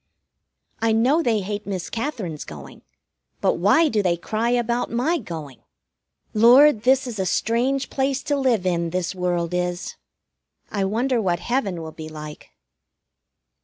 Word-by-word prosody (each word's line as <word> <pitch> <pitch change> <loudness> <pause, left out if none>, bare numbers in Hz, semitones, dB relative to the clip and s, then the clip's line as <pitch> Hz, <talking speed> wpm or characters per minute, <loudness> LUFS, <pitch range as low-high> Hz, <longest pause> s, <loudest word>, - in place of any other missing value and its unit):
I 225 -1 +2
know 255 +9 +3
they 225 -8 +1
hate 205 +2 -5
Miss 190 -3 -3
Katherine's 225 - -4
going; 75 -2 -11 0.6
but - - +1
why 210 - +4
do 220 -7 +1
they 175 -3 +1
cry 220 +6 -2
about 240 0 0
my 285 +9 +1
going? 155 - -8 0.7
Lord, 245 +3 +6
this 265 +3 +3
is 235 -5 -6
a 190 - 0
strange 250 +8 0
place 270 0 -1
to 290 - 0
live 250 -8 +1
in, 170 -2 0
this 180 +1 -2
world 180 -2 -1
is! 180 0 -3 0.7
I 200 -2 0
wonder 235 +4 0
what 180 -4 +1
heaven 195 -5 -2
will 160 - -7
be 155 0 -9
like? 150 -1 -9
215 Hz, 150 wpm, -23 LUFS, 175-250 Hz, 0.7 s, Lord